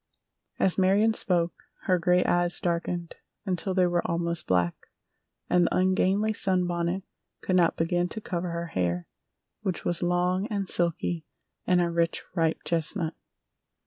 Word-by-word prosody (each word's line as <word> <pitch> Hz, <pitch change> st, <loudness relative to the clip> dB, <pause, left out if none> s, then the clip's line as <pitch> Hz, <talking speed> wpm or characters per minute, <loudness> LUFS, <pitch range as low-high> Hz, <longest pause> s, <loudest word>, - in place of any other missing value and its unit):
As 190 Hz, 0 st, +2 dB
Marion 200 Hz, +4 st, +4 dB
spoke, 175 Hz, -5 st, 0 dB, 0.3 s
her 185 Hz, -2 st, +2 dB
gray 180 Hz, +1 st, +3 dB
eyes 175 Hz, 0 st, +2 dB
darkened 170 Hz, 0 st, -2 dB, 0.3 s
until 185 Hz, 0 st, -2 dB
they 185 Hz, -1 st, +4 dB
were 175 Hz, -1 st, +1 dB
almost 170 Hz, 0 st, -2 dB
black, 90 Hz, -2 st, 0 dB, 0.6 s
and 175 Hz, -1 st, +3 dB
the -, -, -1 dB
ungainly 190 Hz, +3 st, +2 dB
sunbonnet 180 Hz, -2 st, 0 dB, 0.4 s
could 185 Hz, -, 0 dB
not 170 Hz, -2 st, +3 dB
begin 175 Hz, +2 st, 0 dB
to 220 Hz, -, -5 dB
cover 180 Hz, -4 st, -3 dB
her 170 Hz, 0 st, -3 dB
hair, 90 Hz, -1 st, -1 dB, 0.6 s
which 185 Hz, -3 st, -3 dB
was 175 Hz, -, -1 dB
long 180 Hz, +2 st, +1 dB
and 200 Hz, -3 st, -2 dB
silky 170 Hz, -2 st, +1 dB, 0.4 s
and 180 Hz, -1 st, +4 dB
a 170 Hz, -1 st, 0 dB
rich, 170 Hz, 0 st, 0 dB
ripe 165 Hz, -3 st, 0 dB
chestnut. 165 Hz, 0 st, -1 dB
175 Hz, 145 wpm, -27 LUFS, 170-185 Hz, 0.6 s, Marion